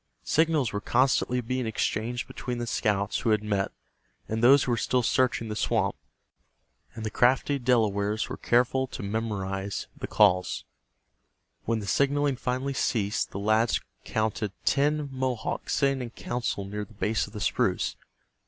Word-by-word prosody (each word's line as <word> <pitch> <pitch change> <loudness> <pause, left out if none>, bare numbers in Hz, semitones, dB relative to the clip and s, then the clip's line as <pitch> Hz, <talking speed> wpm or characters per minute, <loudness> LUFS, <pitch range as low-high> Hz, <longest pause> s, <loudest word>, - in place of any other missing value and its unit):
Signals 155 -6 +2
were 105 - -2
constantly 125 0 +2
being 130 0 -2
exchanged 115 +2 -1
between 125 -1 -5
the 120 - -2
scouts 100 -3 0
who - - 0
had 105 -1 +2
met, 100 -2 0 0.6
and 110 +1 -2
those 135 +3 +7
who 125 - -1
were - - +3
still 125 +2 +1
searching 125 -1 +1
the 105 - -4
swamp, - - +1 1.0
and 110 -1 -5
the 110 - -2
crafty 135 +3 +3
Delawares 110 -4 +1
were - - -5
careful 125 +2 +2
to 125 - -7
memorize 100 -2 -3
the - - -6
calls. 90 -3 +3 1.0
When 115 0 +1
the - - -6
signaling 140 +5 +2
finally 130 +3 -2
ceased 105 -6 0
the - - -7
lads 110 +3 +2 0.2
courted 110 -2 -1
ten 150 +1 +2
Mohawks 130 -3 -2
sitting 135 -2 +2
in 120 - -4
council 120 -4 -3
near 105 +1 -4
the 110 +1 -14
base 110 +2 0
of 100 - -15
the 105 - -5
spruce. - - 0
115 Hz, 155 wpm, -27 LUFS, 105-130 Hz, 1.0 s, those